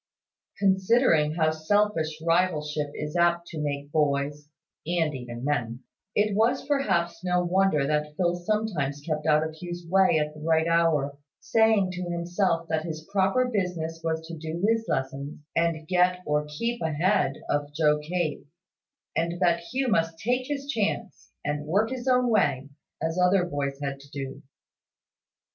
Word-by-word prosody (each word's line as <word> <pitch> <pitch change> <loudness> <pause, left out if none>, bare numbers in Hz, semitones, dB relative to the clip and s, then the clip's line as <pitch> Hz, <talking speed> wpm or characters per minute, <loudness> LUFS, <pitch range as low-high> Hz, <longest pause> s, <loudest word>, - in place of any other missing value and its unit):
Considering 190 - +3
how 160 -2 +2
selfish 160 -1 0
rivalship 155 -4 +1
is 150 +3 -5
apt 170 0 +3
to 160 -3 -6
make 145 -1 -3
boys 145 -1 0 0.4
(and 165 -3 +1
even 125 -1 -6
men), 120 -4 -1 0.3
it 210 -1 +2
was 235 +5 +2
perhaps 185 - 0
no 180 -1 +1
wonder 175 -5 +2
that 150 +1 -1
Phil 175 -2 +2
sometimes 175 -7 -1
kept 155 -1 -2
out 155 0 +4
of 160 0 -4
Hugh's 175 -1 -6
way 190 -1 +4
at 150 0 -1
the 155 - -12
right 160 +1 +2
hour, 155 -4 +2 0.2
saying 220 -4 +3
to 180 0 -5
himself 170 0 0
that 160 -1 0
his 160 -1 -6
proper 195 +5 +2
business 180 -7 -2
was 160 0 -2
to 165 +1 -7
do 165 +3 -3
his 225 0 +1
lessons, 135 +2 -3 0.2
and 165 -2 0
get 180 0 +2
or 150 0 0
keep 235 +4 -2
ahead 160 -1 +1
of 145 0 -1
Joe 150 -1 +3
Cape; 155 -1 -3 0.7
and 170 +1 -1
that 170 -2 +3
Hugh 260 0 0
must 165 -5 +1
take 250 +6 -1
his 280 -1 -3
chance, 220 -5 -2 0.2
and 150 0 -2
work 205 +8 +2
his 260 0 -5
own 250 -1 +4
way, 160 - +1 0.3
as 165 +3 -2
other 180 0 +4
boys 140 -4 -3
had 140 -1 -3
to 140 +1 -16
do. 135 0 -6
165 Hz, 155 wpm, -26 LUFS, 150-190 Hz, 0.7 s, out